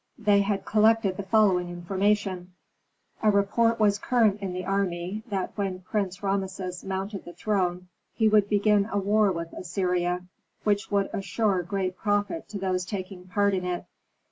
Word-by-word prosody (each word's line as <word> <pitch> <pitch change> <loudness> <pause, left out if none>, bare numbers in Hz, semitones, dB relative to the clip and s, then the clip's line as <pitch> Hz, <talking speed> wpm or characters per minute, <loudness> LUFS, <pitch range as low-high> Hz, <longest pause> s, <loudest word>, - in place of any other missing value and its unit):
They 205 -3 +4
had 200 -1 -1
collected 215 -2 +3
the - - -2
following 190 -3 +3
information: 185 +1 -1 0.7
A 215 - +4
report 220 +3 +2
was 205 -2 +3
current 215 -5 +2
in 195 -2 -3
the 180 0 -4
army, 195 0 -1
that 195 -2 -2
when 195 -3 -2
Prince 195 0 -3
Rameses 190 -2 -2
mounted 195 +1 -4
the 175 - -10
throne, 180 -4 -1 0.3
he 220 - +3
would 210 -1 +4
begin 205 0 +3
a 205 - 0
war 205 +1 +3
with 170 -1 -5
Assyria, 180 0 -1 0.4
which 205 -1 +1
would 200 -1 +1
assure 195 0 0
great 185 +1 -2
profit 205 +10 -1
to 205 - -5
those 185 -1 -1
taking 185 -1 -6
part 200 +2 +2
in 185 -1 -1
it. 180 -1 -3
195 Hz, 160 wpm, -27 LUFS, 185-205 Hz, 0.7 s, They